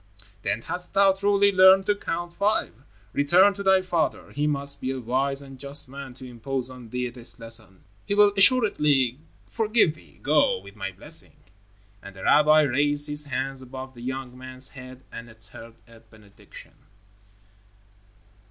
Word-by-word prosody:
"Then 105 +3 -2
hast 180 +2 -2
thou 195 -1 +5
truly 200 +1 +2
learned 190 0 +6
to 205 - +2
Count 175 -3 -5
Five. 205 +3 0 0.4
Return 180 +8 +4
to 200 - -8
thy 190 -1 +3
father. 170 -3 -2
He 150 +1 -1
must 140 -1 -2
be 130 - -3
a 130 0 -3
wise 135 +3 -1
and 135 -1 -13
just 140 +1 -3
man 135 -1 -10
to 130 - -12
impose 125 +1 -5
on 125 -3 -12
thee 125 +1 -3
this 120 0 -5
lesson. 115 -5 -2 0.2
He 200 - 0
will 205 0 +5
assuredly 150 - +3 0.3
forgive 220 -7 +1
thee. 155 - -20
Go, 150 0 +3
with 100 +2 -14
my 95 -2 -5
blessing," - - -2 0.7
and 100 - -12
the 95 - -11
rabbi 155 +1 +5
raised 145 +2 +2
his 150 0 +1
hands 135 0 -4
above 130 +1 -9
the 120 - -13
young 130 0 -6
man's 130 0 -6
head 130 -1 -12
and 115 0 -9
uttered 115 +1 -13
a 115 -1 -17
benediction. 105 -3 -16
135 Hz, 160 wpm, -24 LUFS, 125-175 Hz, 0.7 s, learned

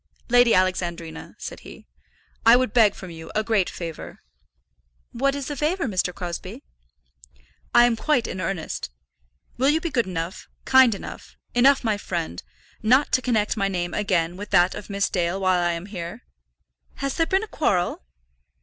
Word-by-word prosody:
"Lady 245 -1 +5
Alexandrina," 175 -3 -2
said - - -7
he, - - -13 0.6
"I 230 +1 +8
would 255 -4 +1
beg 220 -4 +5
from 185 -2 -9
you 160 -1 -10
a 215 - +1
great 215 -5 +1
favour." 165 -3 -8 0.9
"What 275 +3 0
is 280 -1 -4
the 290 - -4
favour, 325 +4 0
Mr. 185 -4 0
Crosbie?" 175 -1 -7 1.1
"I 240 0 +8
am 240 -1 +2
quite 250 0 +1
in 185 - -4
earnest. 165 - -3 0.7
Will 265 +3 +3
you 310 +2 +3
be 335 -1 -4
good 235 -7 +1
enough, 175 0 -5 0.2
kind 260 -4 +6
enough, - - -10 0.2
enough 265 +3 +4
my 215 -3 0
friend, 165 - -4 0.4
not 255 +6 +3
to 255 - +3
connect 225 -5 +1
my 200 -3 0
name 175 -2 -3
again 180 -4 0
with 205 +1 -7
that 180 -2 +4
of 210 - -9
Miss 200 0 0
Dale 175 +1 -1
while 185 -2 +2
I 175 0 +1
am 170 +2 -5
here?" 175 - -7 0.7
"Has 275 -1 -3
there 330 -1 +1
been 385 +2 +1
a - - -6
quarrel?" 185 - 0
205 Hz, 170 wpm, -24 LUFS, 175-250 Hz, 1.1 s, I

